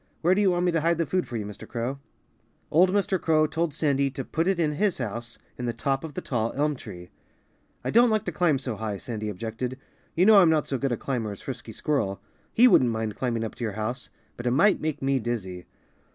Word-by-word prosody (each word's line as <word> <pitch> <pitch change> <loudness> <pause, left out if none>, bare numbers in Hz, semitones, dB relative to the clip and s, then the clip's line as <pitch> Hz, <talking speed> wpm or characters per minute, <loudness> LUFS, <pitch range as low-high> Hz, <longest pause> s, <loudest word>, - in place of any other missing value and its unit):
Where 175 +3 +4
do 200 - +2
you 200 - +4
want 175 0 +1
me 175 - +3
to 165 -2 +1
hide 170 +1 +2
the 165 - +1
food 185 +4 -1
for 120 - -4
you, 105 - -4
Mr. 105 0 -9
Crow?" 125 +3 -3 0.7
Old 180 +4 +5
Mr. 195 -1 +1
Crow 155 -1 +3
told 165 +1 -1
Sandy 140 -2 +1
to 135 -1 -6
put 165 +3 -1
it 195 -1 +2
in 160 -3 +1
his 195 +4 0
house 120 0 -5 0.2
in 125 - -3
the 120 - -1
top 135 +4 -1
of 155 -4 -7
the - - -3
tall 115 -3 -1
elm 150 +1 +1
tree. 90 -8 -10 0.7
"I - - -2
don't 240 +2 +6
like 215 -2 +1
to 180 - -2
climb 160 -3 +2
so 125 -5 -4
high," 105 -2 -3
Sandy 110 -1 -5
objected. 115 +5 -4 0.4
"You 180 - +4
know 210 -1 +8
I'm 175 - +5
not 155 -2 +2
so 135 - -2
good 135 0 -1
a 120 - 0
climber 120 -6 -3
as 100 - -9
Frisky - - -7
Squirrel. 115 -10 -1 0.3
He 245 +3 +6
wouldn't 130 - +5
mind 110 -2 -2
climbing 120 -3 -1
up 110 - -4
to - - -7
your 110 -3 -2
house. 110 +5 -4 0.3
But 120 - -4
it - - +2
might 200 +9 +4
make 155 -3 -3
me 135 0 +2
dizzy." 95 -7 -4
135 Hz, 245 wpm, -26 LUFS, 115-165 Hz, 0.7 s, know